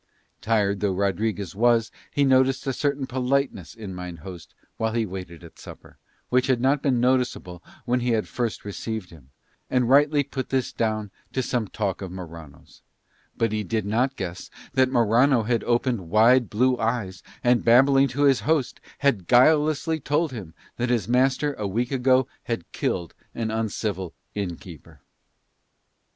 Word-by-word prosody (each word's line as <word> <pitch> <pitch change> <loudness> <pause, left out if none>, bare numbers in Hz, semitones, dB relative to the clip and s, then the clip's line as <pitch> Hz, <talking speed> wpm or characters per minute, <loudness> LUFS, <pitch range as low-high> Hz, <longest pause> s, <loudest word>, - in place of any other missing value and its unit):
Tired 105 -2 +1
though 100 -2 0
Rodriguez 100 0 -1
was 115 +1 +3 0.2
he 145 - +1
noticed 130 0 +3
a 135 - -1
certain 140 0 -1
politeness 130 - -1
in 105 -4 -7
mine 90 -1 -7
host 85 +1 -11 0.2
while 110 0 -1
he 115 -1 0
waited 90 -3 -8
at 85 - -14
supper, - - -13 0.3
which 125 0 +2
had 130 -3 +2
not 135 +3 +2
been 130 -4 +1
noticeable 125 -8 0 0.2
when 125 +1 +1
he 125 0 -1
had 115 -2 +1
first 120 -4 -3
received 105 -1 -5
him, 70 -6 -16 0.4
and 125 -2 +1
rightly 145 +2 +4
put 135 -1 -5
this 130 -2 -1
down 110 -3 -2 0.2
to 130 - 0
some 120 -3 -1
talk 100 -1 -3
of 95 -2 -6
Morano's; 85 -6 -11 0.6
but 115 -2 +1
he 105 0 -1
did 110 +1 -2
not 125 +6 0
guess 90 -5 -6 0.2
that 130 -1 +3
Morano 120 +1 +3
had 115 +1 0
opened 120 -6 0
wide 115 +4 +5
blue 125 +3 +2
eyes 110 -5 -2 0.2
and, 120 -1 +3
babbling 135 +3 +5
to 135 +3 -1
his 135 -2 +4
host, 155 -5 0 0.2
had 115 -11 +1
guilelessly 155 +4 +3
told 150 +3 0
him 95 -10 -8 0.2
that 120 +1 -1
his 115 -6 0
master 130 +4 +2
a 105 - -1
week 120 +6 -2
ago 130 0 +3 0.2
had 115 -8 -4
killed 85 -3 -2 0.2
an 110 -1 -2
uncivil 105 -5 -3 0.2
inn 95 -4 -3
keeper. 85 -5 -14
115 Hz, 165 wpm, -24 LUFS, 100-130 Hz, 0.6 s, wide